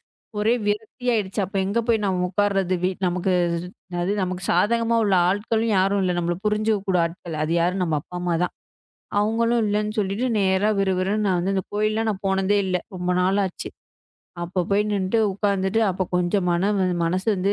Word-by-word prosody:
எனக்கு - - - 0.2
ஒரே 220 +3 +3
விரக்தி 215 +4 -3
ஆயிடுச்சு. 205 -3 -1
அப்போ 195 +2 -5
எங்க 200 +4 0
போய் 225 -2 +2
நம்ம 185 -2 0
உக்காருது 195 -1 +1 0.3
நமக்கு. 180 +1 0 0.7
அது 180 +3 0
நமக்கு 185 0 -3
சாதகமா 230 +6 +2
உள்ள 200 -2 +2 0.2
ஆட்களும் 220 +3 0
யாரும் 195 +1 +2
இல்ல. 180 -1 +1
நம்மள 175 0 -1
புரிஞ்சுக்க 215 0 +1
கூட 185 - +3
ஆட்கள். 165 -1 -6
அது 155 - -2
யாரு? 175 +2 +1
நம்ம 165 -4 0
அப்பா 180 - -9
அம்மா 175 -1 0
தான். 180 - -2 0.7
அவங்களும் 230 +3 +2
இல்லன்னு 210 +1 0
சொல்லிட்டு 205 +5 0
நேரா 190 +1 +2
விறுவிறுன்னு 195 +2 +1
நான் 185 -3 +2
இந்தக் 190 -2 -2
கோயில்ல 215 +1 0
போனதே 195 +1 +2
இல்ல. 185 -1 +1 0.2
ரொம்ப 180 0 -2
நாளாச்சு. 190 0 0 0.7
அப்போ 180 +2 -2
போய் 205 +1 +3
நின்னுட்டு 200 +2 0
உக்காந்துட்டு 200 +1 0
அப்பக் 185 0 -3
கொஞ்சம் 180 +1 +1
மனம் 195 +4 +1
வந்து 185 -1 +1
மனசு 185 +3 -1
வந்து 195 +2 0
195 Hz, 170 wpm, -23 LUFS, 180-210 Hz, 0.7 s, ஒரே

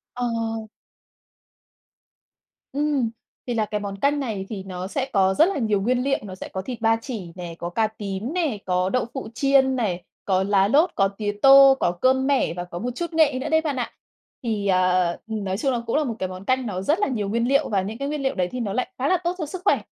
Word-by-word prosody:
Ờ. 245 -1 -1 2.4
Ừm. 285 -5 0 0.4
Thì 245 - -2
là 220 -2 +1
cái 210 0 -3
món 200 -1 -5
canh 285 +1 +2
này 210 -8 -3
thì 205 -4 -5
nó 185 -1 -6
sẽ 260 +7 -3
có 190 -2 +3
rất 310 - +6
là 390 - -2
nhiều 215 -5 +1
nguyên 245 +5 +1
liệu. 275 0 +1
Nó 195 -3 -7
sẽ - - -8
có 190 - -5
thịt 245 +2 -6
ba 225 0 +3
chỉ 205 -10 -6
nè, 175 -2 -7
có 175 0 -4
cà 220 +4 +1
tím 210 +3 -5
nè, 320 - 0
có 180 0 +1
đậu 255 0 0
phụ 265 -5 -5
chiên 265 0 +3
này, 185 -8 -1 0.2
có 190 -1 +2
lá 195 0 +3
lốt, 300 - +4
có 195 -1 +3
tía 205 +1 -3
tô, 275 0 +9
có 175 - +2
cơm 260 +8 +2
mẻ 270 - +2
và 175 0 -4
có 175 -1 -7
một 245 +6 -3
chút 340 +4 -4
nghệ 305 -5 +3
nữa 260 - -3
đấy 320 0 +4
bạn 300 -4 -2
ạ. 245 - -2 0.5
Thì, 215 -4 -2
ờ, 185 -1 +3 0.2
ừm, 220 -2 -4
nói 190 0 -2
chung 270 +2 +1
là 240 - -1
cũng 230 - 0
là 305 - +2
một 240 -5 -2
cái 185 - -2
món 185 +1 -8
canh 255 +2 +1
nó 190 -4 -3
rất 305 - +1
là 415 - +2
nhiều 215 -7 -2
nguyên 235 +3 0
liệu 275 +2 +2
và 195 -3 +1
những 215 +5 -5
cái 275 - -3
nguyên 295 -1 -3
liệu 265 - 0
đấy 180 -2 0
thì 250 - -4
nó 210 -4 -2
lại 255 +3 -1
khá 265 - 0
là 370 - +4
tốt 345 +1 0
cho 320 - -3
sức 365 +5 -6
khỏe. - - +3
225 Hz, 255 wpm, -23 LUFS, 195-275 Hz, 2.4 s, tô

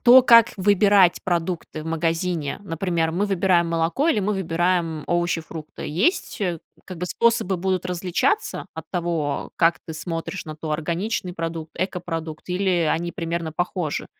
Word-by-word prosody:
то 250 +1 +9
как 230 -2 +7
выбирать 200 -2 +4
продукты 170 -3 -2
в - - -8
магазине. 165 -1 -1
Например, 165 -2 -1
мы 200 +4 0
выбираем 185 -3 +2
молоко 165 - +1
или 270 - +3
мы 205 +2 0
выбираем 170 -3 0
овощи, 175 -1 +1
фрукты. 160 -1 -8
Есть, 200 - 0
э, 175 -5 -1 0.3
как-бы 180 -1 -5
способы 230 -2 +2
будут 185 0 -1
различаться, 180 - -1
от - - -7
того, 165 -5 -2
как 165 0 +3
ты 160 - -6
смотришь 165 +3 -4
на 155 -2 -7
то, 155 0 -4
органичный 175 +5 -2
продукт, 165 -2 -4
экопродукт, 165 -4 -4
или 180 -3 +1
они 170 +1 -1
примерно 165 -1 -3
похожи? 175 -2 -2
175 Hz, 150 wpm, -23 LUFS, 165-190 Hz, 0.3 s, то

